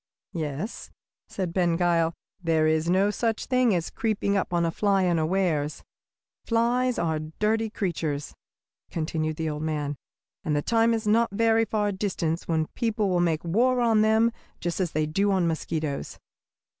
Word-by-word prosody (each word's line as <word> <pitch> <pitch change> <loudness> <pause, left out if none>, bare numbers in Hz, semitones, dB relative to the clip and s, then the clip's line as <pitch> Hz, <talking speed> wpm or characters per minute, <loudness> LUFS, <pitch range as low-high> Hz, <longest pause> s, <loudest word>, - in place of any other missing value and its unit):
"Yes," 155 - -4 0.4
said 180 -4 -4
Ben 175 -2 +2
Gile; 170 -2 +2 0.3
"there 165 -2 +2
is 160 +1 +1
no 195 +3 +3
such 225 +1 -1
thing 250 -5 +3
as 170 -2 -2
creeping 215 -3 0
up 195 - -1
on 170 -1 +1
a 165 - 0
fly 195 +1 +2
unawares. 165 -3 0 0.6
Flies 240 +2 +1
are 160 -2 0 0.2
dirty 220 +1 +1
creatures," 165 -8 -3 0.6
continued 155 -1 -2
the 160 +1 -3
old 150 -1 -3
man, 150 -2 -2 0.5
"and 150 - 0
the 145 - 0
time 230 0 +3
is 220 0 -4
not 230 +2 +3
very 225 +2 +2
far 210 -1 0
distant 180 -4 -2
when 160 -1 +1
people 225 -4 0
will 180 - +2
make 165 -3 +1
war 245 +9 +2
on 225 -3 +3
them 220 +2 +4 0.3
just 175 +1 -3
as 180 -4 -1
they 155 0 +1
do 195 +7 +1
on 190 -3 +2
mosquitoes. 160 -3 -3
180 Hz, 160 wpm, -26 LUFS, 160-220 Hz, 0.6 s, them